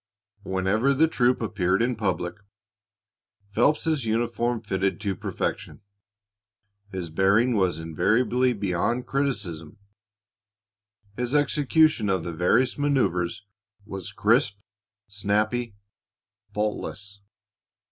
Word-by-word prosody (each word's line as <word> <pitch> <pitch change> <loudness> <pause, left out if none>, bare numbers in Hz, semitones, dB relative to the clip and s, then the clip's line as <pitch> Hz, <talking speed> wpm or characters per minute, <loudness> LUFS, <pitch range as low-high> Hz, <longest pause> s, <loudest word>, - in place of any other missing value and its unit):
Whenever 100 +8 +1
the 160 +4 +4
troop 125 -5 +1
appeared 90 -3 +1
in 120 +1 +1
public, 95 -5 -1 1.2
Phelps's 150 +4 +2
uniform 120 +1 0
fitted 95 -4 -1
to 100 -3 -1
perfection, - - -4 1.1
his 90 -4 -5
bearing 100 +8 +3
was 95 -6 +1
invariably 115 +10 +1
beyond 100 +4 -1
criticism, 105 - -2 1.4
his 125 +4 -2
execution 145 -4 +3
of 95 -3 +1
the 85 - -4
various 100 - +2
manoeuvers 105 - 0 0.4
was 100 0 -6
crisp, 105 +1 +2 0.5
snappy, 105 +3 -1 0.8
faultless. 105 -1 -3
105 Hz, 90 wpm, -25 LUFS, 95-125 Hz, 1.4 s, the